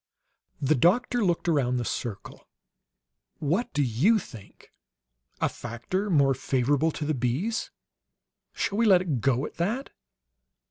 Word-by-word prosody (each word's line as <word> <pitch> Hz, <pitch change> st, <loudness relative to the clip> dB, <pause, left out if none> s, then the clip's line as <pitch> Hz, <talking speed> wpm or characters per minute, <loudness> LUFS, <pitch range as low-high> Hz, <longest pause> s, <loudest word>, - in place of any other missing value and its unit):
The 145 Hz, +1 st, +2 dB
doctor 220 Hz, -, +2 dB
looked 175 Hz, -2 st, 0 dB
around 135 Hz, -6 st, +2 dB
the 120 Hz, -, -2 dB
circle. 105 Hz, -4 st, -6 dB, 0.9 s
"What 175 Hz, +11 st, -1 dB
do 145 Hz, -, +1 dB
you 135 Hz, -, +3 dB
think? 115 Hz, -, -11 dB, 0.7 s
'A -, -, +1 dB
factor 120 Hz, -, -4 dB
more 140 Hz, -6 st, +4 dB
favorable 135 Hz, +4 st, +1 dB
to 150 Hz, -, -4 dB
the 155 Hz, -, 0 dB
bees.' 135 Hz, -, -1 dB, 0.8 s
Shall 200 Hz, -, -2 dB
we 230 Hz, -, +4 dB
let 185 Hz, -3 st, +6 dB
it 145 Hz, -10 st, -2 dB
go 135 Hz, +2 st, +1 dB
at -, -, -9 dB
that?" 225 Hz, +11 st, -2 dB
150 Hz, 135 wpm, -27 LUFS, 125-190 Hz, 0.9 s, let